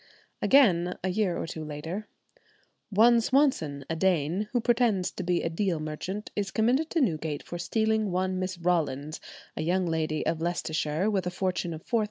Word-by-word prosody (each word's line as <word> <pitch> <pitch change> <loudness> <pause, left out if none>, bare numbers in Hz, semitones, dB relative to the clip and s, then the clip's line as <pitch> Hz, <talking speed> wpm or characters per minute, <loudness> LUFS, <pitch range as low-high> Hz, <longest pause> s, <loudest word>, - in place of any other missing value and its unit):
Again, 180 -10 +4
a 185 - 0
year 185 -1 0
or - - -3
two 160 -1 -6
later, 160 +8 -5 0.8
"one 230 +3 +5
Swanson, 230 - +1
a 165 - -2
Dane, 180 +3 +1
who 245 - +2
pretends 235 -5 +2
to - - -6
be 175 -1 0
a 165 - 0
Deal 175 -1 0
merchant, 155 +7 -5
is 200 -2 -1
committed 250 +10 +1
to 330 - +1
Newgate 160 - -1
for 175 - -7
stealing 220 +3 +1
one 185 +1 -1
Miss 185 0 -3
Rawlins, 155 -4 -1 0.4
a - - -3
young 180 +3 +1
lady 160 -2 -1
of 165 -1 -1
Leicestershire, 165 0 -1
with 190 -3 0
a - - +1
fortune 180 -1 -2
of 160 -1 -8
£4,000. 235 - +1
180 Hz, 180 wpm, -28 LUFS, 160-215 Hz, 0.8 s, one